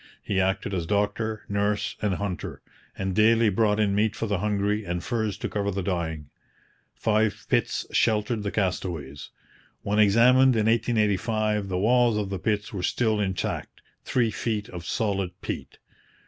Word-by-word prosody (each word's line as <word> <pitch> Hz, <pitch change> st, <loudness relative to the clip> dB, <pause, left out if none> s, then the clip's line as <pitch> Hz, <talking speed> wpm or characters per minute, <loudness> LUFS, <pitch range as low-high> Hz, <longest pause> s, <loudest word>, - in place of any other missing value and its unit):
He 95 Hz, -, 0 dB
acted 95 Hz, +1 st, -1 dB
as 85 Hz, -3 st, -2 dB
doctor, 105 Hz, +2 st, -1 dB
nurse, 100 Hz, 0 st, -1 dB
and 105 Hz, -3 st, +1 dB
hunter, 100 Hz, -3 st, -5 dB, 0.3 s
and 95 Hz, -1 st, -2 dB
daily 110 Hz, +2 st, +4 dB
brought 105 Hz, +1 st, +2 dB
in 105 Hz, -2 st, +2 dB
meat 105 Hz, +2 st, +1 dB
for -, -, -2 dB
the 100 Hz, -4 st, -1 dB
hungry 105 Hz, +1 st, 0 dB
and 85 Hz, -2 st, -3 dB
furs 110 Hz, -4 st, -2 dB
to -, -, -3 dB
cover 100 Hz, -1 st, -2 dB
the 100 Hz, -1 st, -2 dB
dying. 80 Hz, -5 st, -3 dB, 0.6 s
Five 110 Hz, -1 st, 0 dB
pits -, -, +1 dB
sheltered 110 Hz, 0 st, +1 dB
the 100 Hz, -, -2 dB
castaways. 85 Hz, -8 st, -3 dB, 0.5 s
When 105 Hz, +1 st, 0 dB
examined 125 Hz, +5 st, +5 dB
in 110 Hz, -1 st, +1 dB
1885 110 Hz, -2 st, +1 dB
the 95 Hz, -1 st, -2 dB
walls 120 Hz, +2 st, +3 dB
of 100 Hz, -2 st, -2 dB
the 95 Hz, -, -3 dB
pits 105 Hz, +1 st, -1 dB
were 95 Hz, -, -3 dB
still 110 Hz, +3 st, +1 dB
intact 95 Hz, -2 st, -3 dB, 0.2 s
three 120 Hz, -3 st, +1 dB
feet 105 Hz, -1 st, -3 dB
of 85 Hz, -1 st, -8 dB
solid 100 Hz, -5 st, -1 dB
peat. -, -, -6 dB
105 Hz, 160 wpm, -26 LUFS, 95-110 Hz, 0.6 s, examined